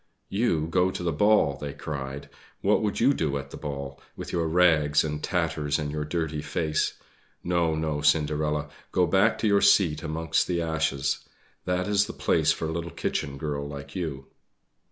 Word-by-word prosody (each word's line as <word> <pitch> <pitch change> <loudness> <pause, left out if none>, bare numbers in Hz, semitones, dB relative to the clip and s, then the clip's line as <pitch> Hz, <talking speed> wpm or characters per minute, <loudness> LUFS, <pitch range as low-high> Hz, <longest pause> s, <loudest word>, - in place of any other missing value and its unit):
"You 95 -7 +1
go 90 +3 +2
to 90 - -5
the 85 - +1
ball!" 80 -4 +3
they 70 0 -5
cried. 70 -2 -6 0.3
"What - - +3
would 105 -2 -1
you 135 +4 +5
do 75 - -1
at 70 0 -7
the - - -7
ball, 70 -2 -6
with - - -7
your 85 -2 0
rags 80 -3 +4
and 75 -1 -3
tatters 75 -1 0
and 75 -2 -3
your 75 0 -3
dirty 80 -1 -2
face? 75 0 -1 0.5
No, 85 -2 +1
no, 80 -2 -1
Cinderella, 75 0 +1 0.2
go 90 - +3
back 95 +6 +3
to 110 - 0
your 100 -1 +4
seat 80 -7 +4
amongst 80 +1 0
the 85 -1 0
ashes 80 -4 -1 0.4
that 90 +1 0
is 100 0 +2
the - - -6
place - - +2
for - - -2
a 80 - -2
little 85 +1 -3
kitchen 70 -2 -3
girl 70 -1 -3
like 70 0 -8
you!" 75 -7 -4
80 Hz, 180 wpm, -26 LUFS, 75-85 Hz, 0.5 s, you